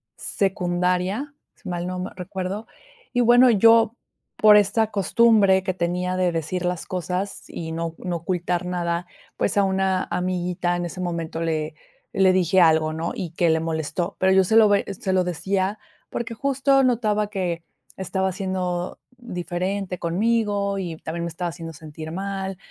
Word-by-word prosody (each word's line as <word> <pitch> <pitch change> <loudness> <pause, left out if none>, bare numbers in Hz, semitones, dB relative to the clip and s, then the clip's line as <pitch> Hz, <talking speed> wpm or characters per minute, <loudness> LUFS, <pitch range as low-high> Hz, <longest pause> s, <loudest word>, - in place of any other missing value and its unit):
secundaria, 180 +7 -1 0.2
si 200 - -14
mal 175 0 -3
no 185 - -4
me 185 - -4
recuerdo 190 +3 -5 0.4
y 245 - +1
bueno, 245 +2 +6
yo 225 +1 +5 0.4
por 210 -1 +7
esta 210 +2 +2
costumbre 200 -1 +4
que 185 -1 -1
tenía 180 +1 -1
de 180 -1 +2
decir 170 +2 -2
las 180 -1 -2
cosas 185 +2 -3
y 160 -1 -6
no 165 0 -3
no 175 -2 -3
ocultar 175 +1 -2
nada, 175 -1 -2 0.3
pues, 200 - 0
a 200 - +5
una 190 -1 +1
amiguita 180 -1 -1
en 175 0 -2
ese 180 +2 -6
momento 165 -2 -3
le 155 -2 -1 0.4
le 190 -1 +4
dije 185 0 +3
algo, 160 -1 +4
¿no?, 165 +1 -3
y 170 -4 -5
que 170 0 +1
le 160 0 +3
molestó, 165 +3 -2
pero 190 0 +3
yo 190 0 +5
se 220 +5 +1
lo 220 -2 +7
ve 205 -1 +3
se 190 - -1
lo 185 -1 +3
decía 190 +3 -1 0.3
porque 235 -1 -4
justo 275 +2 +2
notaba 215 -4 +1
que 180 -5 -2 0.3
estaba 190 0 -1
siendo 185 -1 -3 0.2
diferente 185 -3 -3
conmigo 205 +2 0
y 175 -4 -4
también 170 +2 -4
me - - -3
estaba 170 +1 -3
haciendo 165 -1 -8
sentir 155 +1 -9
mal. 195 +1 -4
185 Hz, 165 wpm, -23 LUFS, 175-200 Hz, 0.4 s, por